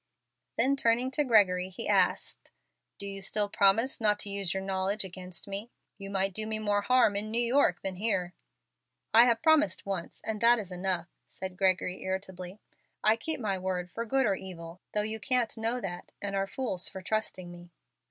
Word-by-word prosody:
Then 275 Hz, +1 st, +3 dB
turning 245 Hz, 0 st, +1 dB
to 295 Hz, +2 st, +1 dB
Gregory 190 Hz, -7 st, +3 dB
he 190 Hz, -, -6 dB
asked, -, -, +1 dB, 0.5 s
"Do 200 Hz, -, -6 dB
you 195 Hz, 0 st, -5 dB
still 205 Hz, +2 st, +1 dB
promise 205 Hz, +6 st, +3 dB
not 210 Hz, -1 st, +3 dB
to 200 Hz, -, -3 dB
use 200 Hz, -3 st, -1 dB
your 190 Hz, +1 st, -2 dB
knowledge 195 Hz, +2 st, -1 dB
against 180 Hz, 0 st, -5 dB
me? 200 Hz, +3 st, -5 dB, 0.3 s
You 195 Hz, 0 st, -7 dB
might 195 Hz, -1 st, 0 dB
do 215 Hz, +2 st, -2 dB
me 220 Hz, 0 st, -2 dB
more 205 Hz, -1 st, 0 dB
harm 235 Hz, -1 st, +3 dB
in 210 Hz, +2 st, -2 dB
New 225 Hz, -, -1 dB
York 240 Hz, -7 st, +3 dB
than 190 Hz, -1 st, -4 dB
here." 185 Hz, -4 st, 0 dB, 0.8 s
"I 230 Hz, +2 st, +9 dB
have 235 Hz, +1 st, +1 dB
promised 310 Hz, -, +3 dB
once, 190 Hz, -4 st, -4 dB
and 220 Hz, -1 st, -3 dB
that 235 Hz, +1 st, +6 dB
is 200 Hz, -5 st, -6 dB
enough," 180 Hz, -1 st, -1 dB, 0.2 s
said 190 Hz, -1 st, -6 dB
Gregory, 185 Hz, -1 st, +1 dB
irritably. 190 Hz, 0 st, -5 dB, 0.4 s
"I 215 Hz, +1 st, +5 dB
keep 310 Hz, +7 st, -3 dB
my 200 Hz, -5 st, -1 dB
word 180 Hz, -1 st, -3 dB
for 230 Hz, -, -4 dB
good 265 Hz, +3 st, +1 dB
or 205 Hz, -, +2 dB
evil, 180 Hz, -2 st, -8 dB
though 210 Hz, -, +2 dB
you 220 Hz, +1 st, -2 dB
can't 245 Hz, +1 st, 0 dB
know 225 Hz, +2 st, -1 dB
that, 175 Hz, -5 st, -6 dB
and 200 Hz, -1 st, -3 dB
are 195 Hz, 0 st, 0 dB
fools 200 Hz, -6 st, -2 dB
for 190 Hz, -, -9 dB
trusting 185 Hz, -4 st, -2 dB
me." 175 Hz, 0 st, -12 dB
200 Hz, 190 wpm, -29 LUFS, 185-225 Hz, 0.8 s, I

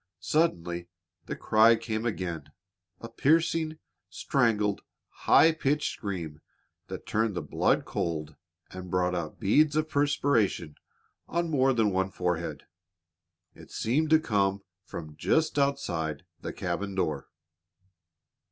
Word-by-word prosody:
Suddenly 85 Hz, -, 0 dB, 0.4 s
the -, -, -3 dB
cry 110 Hz, +2 st, +5 dB
came 110 Hz, 0 st, -3 dB
again, 85 Hz, -8 st, -3 dB, 0.6 s
a 115 Hz, -, -6 dB
piercing, 160 Hz, +5 st, +1 dB, 0.3 s
strangled, 110 Hz, -8 st, +1 dB, 0.5 s
high 165 Hz, -, +7 dB
pitched 150 Hz, -2 st, 0 dB
scream 85 Hz, -7 st, -5 dB, 0.5 s
that -, -, -7 dB
turned 110 Hz, -2 st, 0 dB
the 85 Hz, -, -2 dB
blood -, -, +1 dB
cold 80 Hz, -3 st, -3 dB, 0.4 s
and 90 Hz, 0 st, -8 dB
brought 90 Hz, 0 st, +1 dB
out 85 Hz, -4 st, -4 dB
beads 150 Hz, +9 st, +3 dB
of 155 Hz, 0 st, +1 dB
perspiration 140 Hz, -, +1 dB, 0.5 s
on 170 Hz, -1 st, -1 dB
more 135 Hz, -2 st, +3 dB
than 110 Hz, -5 st, +2 dB
one 95 Hz, 0 st, 0 dB
forehead. 90 Hz, -2 st, -3 dB, 0.9 s
It -, -, -15 dB
seemed 150 Hz, +8 st, 0 dB
to 160 Hz, 0 st, +6 dB
come 100 Hz, -8 st, 0 dB, 0.2 s
from 80 Hz, -4 st, -8 dB
just 160 Hz, -2 st, +1 dB
outside 90 Hz, -, -1 dB, 0.2 s
the -, -, -4 dB
cabin 95 Hz, +3 st, -3 dB
door. 75 Hz, -7 st, -2 dB
105 Hz, 120 wpm, -28 LUFS, 90-145 Hz, 0.9 s, high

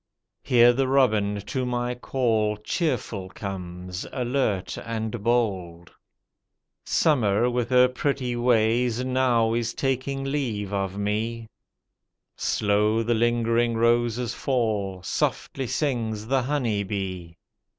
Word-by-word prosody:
Here 120 Hz, 0 st, +5 dB
the 135 Hz, +1 st, +1 dB
robin 110 Hz, -7 st, +2 dB
to 130 Hz, +3 st, -2 dB
my 125 Hz, 0 st, -1 dB
call 115 Hz, -4 st, 0 dB
cheerful 105 Hz, -, -2 dB
comes, 90 Hz, -2 st, -6 dB
alert 125 Hz, -6 st, -1 dB
and 110 Hz, -1 st, -4 dB
bold. 95 Hz, -8 st, -1 dB, 0.9 s
Summer 120 Hz, -6 st, +2 dB
with 120 Hz, -1 st, -1 dB
her 125 Hz, 0 st, +6 dB
pretty 125 Hz, -1 st, -2 dB
ways 120 Hz, +1 st, +2 dB
now 125 Hz, -3 st, +2 dB
is 115 Hz, 0 st, -1 dB
taking 135 Hz, +1 st, -1 dB
leave 120 Hz, -8 st, -2 dB
of 95 Hz, -1 st, -2 dB
me. 110 Hz, +3 st, -2 dB, 0.9 s
Slow 105 Hz, +2 st, +1 dB
the 120 Hz, +1 st, +1 dB
lingering 115 Hz, 0 st, +1 dB
roses 120 Hz, +1 st, +1 dB
fall, 105 Hz, -8 st, -1 dB
softly 135 Hz, +7 st, -2 dB
sings 115 Hz, -5 st, -1 dB
the 135 Hz, +3 st, +1 dB
honey 125 Hz, -6 st, 0 dB
bee. 95 Hz, -4 st, -5 dB
115 Hz, 110 wpm, -25 LUFS, 105-125 Hz, 0.9 s, her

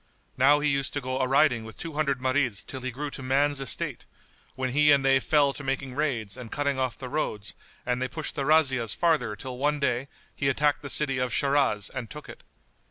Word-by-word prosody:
Now 145 Hz, +3 st, +5 dB
he 150 Hz, -, +1 dB
used 140 Hz, -1 st, 0 dB
to 145 Hz, -, -1 dB
go 130 Hz, -1 st, -3 dB
a 130 Hz, -, +1 dB
riding 135 Hz, -3 st, +3 dB
with 110 Hz, 0 st, -11 dB
two 165 Hz, -2 st, -6 dB
hundred 145 Hz, -3 st, 0 dB
Marids 130 Hz, -5 st, 0 dB
till 130 Hz, -, -6 dB
he 130 Hz, -, -3 dB
grew 140 Hz, +4 st, -5 dB
to -, -, -8 dB
man's 140 Hz, +2 st, +1 dB
estate, 130 Hz, -5 st, -2 dB, 0.5 s
when 130 Hz, -1 st, -2 dB
he 150 Hz, +2 st, +5 dB
and 140 Hz, -1 st, +4 dB
they 135 Hz, 0 st, +5 dB
fell 145 Hz, 0 st, +3 dB
to 140 Hz, -, -8 dB
making 135 Hz, -1 st, -2 dB
raids 125 Hz, -8 st, -2 dB
and 125 Hz, -3 st, -9 dB
cutting 140 Hz, -2 st, -1 dB
off 130 Hz, -2 st, -1 dB
the 130 Hz, -, -7 dB
roads 110 Hz, -7 st, -3 dB, 0.3 s
and 125 Hz, 0 st, -1 dB
they 130 Hz, -, 0 dB
pushed 160 Hz, +3 st, -4 dB
their 135 Hz, -1 st, -2 dB
razzias 130 Hz, -8 st, +3 dB
farther 160 Hz, -11 st, +1 dB
till 125 Hz, +3 st, -7 dB
one 145 Hz, +1 st, +1 dB
day 135 Hz, -1 st, 0 dB, 0.3 s
he 140 Hz, -, +1 dB
attacked 145 Hz, +2 st, +1 dB
the 140 Hz, -, -6 dB
city 135 Hz, -3 st, 0 dB
of 125 Hz, -1 st, -1 dB
Shiraz 135 Hz, -8 st, +1 dB
and 125 Hz, -4 st, -5 dB
took 150 Hz, 0 st, -10 dB
it. -, -, -11 dB
135 Hz, 225 wpm, -27 LUFS, 125-145 Hz, 0.5 s, Now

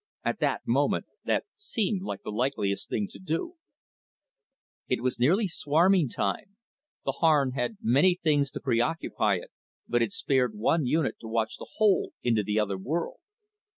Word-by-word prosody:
At -, -, -1 dB
the -, -, +1 dB
moment, -, -, +1 dB, 0.2 s
that -, -, +1 dB
seemed 220 Hz, -, -1 dB
the 190 Hz, -, -5 dB
likeliest 105 Hz, -4 st, -1 dB
thing 105 Hz, -2 st, -1 dB
to -, -, -10 dB
do. 190 Hz, -, -3 dB, 1.3 s
_It 125 Hz, -, +1 dB
was 125 Hz, 0 st, -1 dB
nearly 185 Hz, -, +3 dB
swarming 165 Hz, 0 st, +3 dB
time, 115 Hz, -, -3 dB, 0.5 s
the -, -, +1 dB
Harn 150 Hz, -5 st, +3 dB
had 130 Hz, -, -2 dB
many 145 Hz, +10 st, +4 dB
things 145 Hz, -5 st, +1 dB
to -, -, -4 dB
preoccupy 120 Hz, -4 st, +1 dB
it, 90 Hz, -, -7 dB, 0.4 s
but 120 Hz, 0 st, +1 dB
it 115 Hz, -3 st, +1 dB
spared 125 Hz, -3 st, 0 dB
one 130 Hz, +7 st, +1 dB
unit 155 Hz, +1 st, +1 dB
to 115 Hz, -, -9 dB
watch 110 Hz, 0 st, -1 dB
the -, -, -9 dB
hole 210 Hz, -4 st, +3 dB
into 115 Hz, -3 st, +2 dB
the 105 Hz, +1 st, 0 dB
other 100 Hz, -3 st, -1 dB
world. 160 Hz, -, -3 dB
135 Hz, 155 wpm, -28 LUFS, 115-170 Hz, 1.3 s, many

